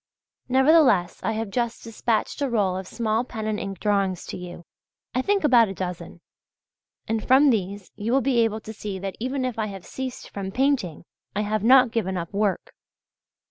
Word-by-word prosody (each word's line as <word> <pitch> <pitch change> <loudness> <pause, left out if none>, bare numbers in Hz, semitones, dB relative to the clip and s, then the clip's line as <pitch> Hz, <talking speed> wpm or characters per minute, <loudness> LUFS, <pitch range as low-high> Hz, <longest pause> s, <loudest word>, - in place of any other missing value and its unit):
Nevertheless 265 - +4
I 225 - -1
have 220 -2 -3
just 235 +1 -2
dispatched 225 +2 -1
a 280 - +1
roll 200 -6 +1
of 190 0 -5
small 225 +1 0
pen 220 -3 -6
and 215 -1 -1
ink 195 -2 -5
drawings 195 -3 0
to - - -6
you 175 -1 -9 0.5
I 255 - +1
think 400 +6 +1
about 245 -6 +6
a 195 - -6
dozen 180 -2 -6 0.9
and 220 -1 -1
from 270 +2 +5
these 200 -3 -3
you 210 +2 -3
will 270 +2 +3
be 255 -2 +2
able 220 -1 +1
to 220 - -8
see 205 -2 -5
that 190 0 -5
even 255 +2 -2
if 245 -3 -3
I 215 - 0
have 195 -3 -8
ceased 260 -1 -6
from 195 -1 -5
painting, 255 - 0 0.3
I 210 - +1
have 215 0 -1
not 255 0 +6
given 190 -5 -1
up 170 +1 -5
work. 200 -3 -1
220 Hz, 190 wpm, -24 LUFS, 195-250 Hz, 0.9 s, about